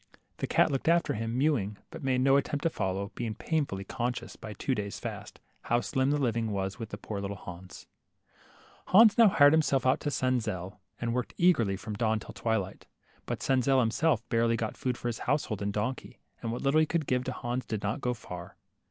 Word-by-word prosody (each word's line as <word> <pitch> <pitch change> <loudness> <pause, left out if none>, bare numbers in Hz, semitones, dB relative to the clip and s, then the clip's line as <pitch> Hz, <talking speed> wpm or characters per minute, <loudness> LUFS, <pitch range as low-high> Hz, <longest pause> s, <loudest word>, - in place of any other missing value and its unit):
The - - -2
cat - - +3
looked 135 +2 -2
after 170 +1 +3
him, 115 +2 -3
mewing, 125 -8 +1
but 165 -2 -9
made 130 -1 +1
no 135 +1 +5
at 140 - +3
tempt 145 -2 -3
to 165 - +2
follow, 100 -1 -2
being 115 -3 -4
painfully 140 - -1
conscious* 120 +2 -3
by 110 - -8
two 130 +7 -1
days' 100 -4 -4
fast, - - -7 0.3
how 120 - +2
slim 130 +5 0
the 145 - +2
living 115 -5 0
was 95 0 -3
with 110 -3 -6
poor 100 -2 -4
little 100 0 -4
Hans. 90 0 -10 1.0
Hans 220 +2 +7
now 230 -2 +7
hired 145 -7 +6
himself 150 -4 +2
out 130 - +3
to 145 - -2
Senzel, 110 -8 -1 0.2
and 115 -1 -1
worked 125 0 -2
LITTLE 175 - +2
HANS, 180 - +5
27 115 - +1
eagerly 95 - -2
from 105 - -6
dawn 110 +1 +1
till - - -10
twilight. 110 -5 -2 0.4
But - - -3
Senzel 135 0 +3
himself 120 +1 +1
barely 115 0 +2
got 110 -1 -3
food 125 -2 -2
for - - -4
his 120 - -3
household 130 -8 0
and 100 0 -1
donkey, 120 +4 -3 0.2
and 115 - -3
what 120 - -4
little 140 +3 +4
he 155 - +3
could 165 -1 0
give 125 -1 0
Hans 125 0 -3
did 110 -3 -3
not 105 +6 -2
go 125 -1 0
far. 90 -5 -9
120 Hz, 215 wpm, -29 LUFS, 105-135 Hz, 1.0 s, Hans